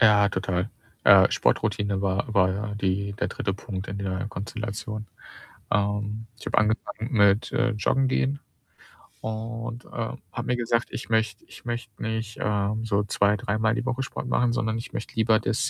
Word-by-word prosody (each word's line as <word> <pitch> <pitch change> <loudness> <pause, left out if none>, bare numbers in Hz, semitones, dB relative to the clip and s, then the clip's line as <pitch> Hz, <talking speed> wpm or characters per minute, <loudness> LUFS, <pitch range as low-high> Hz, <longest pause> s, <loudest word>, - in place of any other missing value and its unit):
Ja, 105 -3 +6
total, 95 +1 -1 0.3
äh, - - +8
Sportroutine 100 -2 +1
war 100 +3 0
war 95 -2 +5
ja 105 +2 -3
die 100 0 0
der - - -1
3. 95 -2 -2
Punkt 100 -1 -5
in 100 - -4
der 95 0 -2
Konstellation. 110 0 -5 0.7
Ähm, 105 +2 0
ich - - -12
habe - - -1
angefangen 110 +2 -1
mit, 105 -2 +4
äh, 125 - +2
Joggen 130 +5 +2
gehen 135 +2 +1 0.8
und, 115 +2 -4
äh, - - -16 0.4
habe 115 - -3
mir 125 - +1
gesagt, 120 -1 +1
ich - - -6
möchte 110 -2 +1
ich - - -14
möchte 120 -3 -5
nicht, 110 0 -3
äh, 100 -1 +1
so 105 -2 +1
zwei 100 0 +3
dreimal 110 +3 +1
die 125 0 -2
Woche 130 0 0
Sport 130 - -5
machen, 120 -1 +2
sondern 110 -2 0
ich 115 - -7
möchte - - -5
lieber 110 -1 +4
das, 110 0 0
110 Hz, 170 wpm, -26 LUFS, 100-115 Hz, 0.8 s, äh